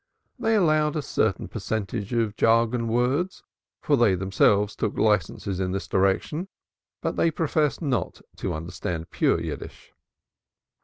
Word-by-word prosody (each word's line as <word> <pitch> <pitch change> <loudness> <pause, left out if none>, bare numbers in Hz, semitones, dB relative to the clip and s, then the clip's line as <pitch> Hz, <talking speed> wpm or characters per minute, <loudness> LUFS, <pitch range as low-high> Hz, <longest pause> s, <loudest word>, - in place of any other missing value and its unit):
They 225 -2 +2
allowed 155 -6 +3
a 155 - -1
certain 110 -8 0
percentage 105 0 -3
of 115 -3 0
jargon 115 +1 +2
words, 130 +11 0 0.4
for 145 - +3
they 115 -7 +4
themselves 100 +2 +2
took 110 - -2
licenses 100 -2 +1
in 90 -1 -1
this 95 - -3
direction, 100 - 0 0.6
but - - -2
they 165 - +3
professed 155 -1 0
not 125 - -1 0.2
to - - -3
understand 80 +1 -5
pure - - +2
Yiddish. - - -7
115 Hz, 135 wpm, -25 LUFS, 95-150 Hz, 0.6 s, they